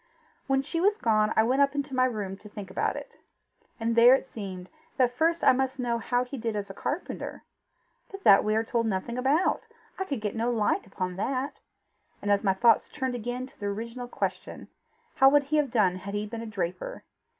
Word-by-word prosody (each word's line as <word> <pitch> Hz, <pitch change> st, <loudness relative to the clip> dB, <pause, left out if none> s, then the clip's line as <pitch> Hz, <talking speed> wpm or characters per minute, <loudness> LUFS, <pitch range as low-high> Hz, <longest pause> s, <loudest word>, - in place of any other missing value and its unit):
When 270 Hz, 0 st, +2 dB
she 330 Hz, +4 st, -2 dB
was 410 Hz, +3 st, +3 dB
gone, 215 Hz, -, +2 dB
I 220 Hz, -, +5 dB
went 255 Hz, +5 st, +2 dB
up 280 Hz, 0 st, +3 dB
to 285 Hz, -2 st, -3 dB
my 255 Hz, 0 st, +4 dB
room 210 Hz, -6 st, -3 dB
to 210 Hz, +1 st, -13 dB
think 205 Hz, -2 st, -8 dB
about -, -, 0 dB
it. -, -, -9 dB, 0.6 s
And 230 Hz, 0 st, 0 dB
there 240 Hz, +2 st, +8 dB
it -, -, -3 dB
seemed 190 Hz, -7 st, -7 dB, 0.3 s
that 250 Hz, -2 st, +2 dB
first 330 Hz, +4 st, +1 dB
I -, -, +7 dB
must 265 Hz, +1 st, 0 dB
know 235 Hz, -2 st, 0 dB
how 245 Hz, +2 st, 0 dB
he 250 Hz, +1 st, -7 dB
did 225 Hz, -1 st, -2 dB
as 200 Hz, -1 st, -4 dB
a -, -, -9 dB
carpenter. 295 Hz, -, -5 dB, 0.7 s
But 390 Hz, 0 st, -10 dB
that 195 Hz, -, +7 dB
we 215 Hz, 0 st, +1 dB
are 220 Hz, -, +2 dB
told 230 Hz, 0 st, 0 dB
nothing 215 Hz, +3 st, -2 dB
about. 305 Hz, -, +1 dB, 0.3 s
I 380 Hz, -, -1 dB
could 280 Hz, -9 st, -3 dB
get 210 Hz, 0 st, -3 dB
no 230 Hz, +2 st, 0 dB
light 220 Hz, -2 st, 0 dB
upon 185 Hz, -2 st, -4 dB
that. 260 Hz, +6 st, -2 dB, 0.6 s
And 205 Hz, -, -1 dB
so 200 Hz, -, -6 dB
my 195 Hz, -2 st, +2 dB
thoughts 230 Hz, +3 st, +4 dB
turned 260 Hz, -4 st, -3 dB
again 245 Hz, +2 st, -4 dB
to 260 Hz, -, -19 dB
the 205 Hz, -, -3 dB
original 230 Hz, +4 st, -5 dB
question. -, -, -4 dB, 0.5 s
How 270 Hz, 0 st, +8 dB
would 290 Hz, +1 st, +4 dB
he 295 Hz, +2 st, 0 dB
have 295 Hz, -3 st, +2 dB
done 200 Hz, -6 st, +2 dB
had 200 Hz, +2 st, -6 dB
he 205 Hz, 0 st, -1 dB
been 225 Hz, +2 st, -6 dB
a 230 Hz, -, -6 dB
draper? 210 Hz, -, -4 dB
235 Hz, 215 wpm, -27 LUFS, 210-270 Hz, 0.7 s, there